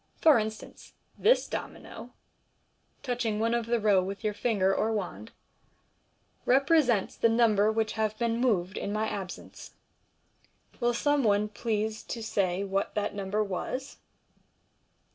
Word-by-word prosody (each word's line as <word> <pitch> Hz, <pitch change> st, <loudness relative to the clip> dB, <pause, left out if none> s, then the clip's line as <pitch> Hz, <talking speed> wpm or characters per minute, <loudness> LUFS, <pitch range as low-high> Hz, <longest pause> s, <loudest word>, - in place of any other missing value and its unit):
For 310 Hz, -7 st, +6 dB
instance, 215 Hz, 0 st, -7 dB, 0.2 s
this -, -, +3 dB
domino -, -, -7 dB, 0.4 s
" -, -, -42 dB
(touching 240 Hz, -4 st, -1 dB
one 230 Hz, +1 st, +1 dB
of 235 Hz, -1 st, -1 dB
the 235 Hz, 0 st, +1 dB
row 205 Hz, -3 st, +4 dB
with 195 Hz, +3 st, -6 dB
your 210 Hz, -1 st, 0 dB
finger 200 Hz, -4 st, +1 dB
or 220 Hz, -, 0 dB
wand) 215 Hz, +2 st, -4 dB, 0.6 s
" -, -, -42 dB
represents 275 Hz, -, +3 dB
the 230 Hz, -, +3 dB
number 220 Hz, -2 st, +3 dB
which 220 Hz, 0 st, 0 dB
have 215 Hz, -1 st, -1 dB
been 235 Hz, 0 st, 0 dB
moved 200 Hz, -6 st, +1 dB
in 200 Hz, -, -3 dB
my 215 Hz, +1 st, -1 dB
absence. 190 Hz, -3 st, -7 dB, 1.0 s
Will 240 Hz, -1 st, +1 dB
some 290 Hz, +2 st, +2 dB
one 210 Hz, -1 st, +2 dB
please 215 Hz, 0 st, -2 dB
to 230 Hz, -, -5 dB
say 195 Hz, -3 st, 0 dB
what 195 Hz, 0 st, -2 dB
that 210 Hz, -1 st, -1 dB
number 200 Hz, +1 st, -1 dB
was?" 235 Hz, +7 st, -5 dB
215 Hz, 145 wpm, -28 LUFS, 205-235 Hz, 1.0 s, For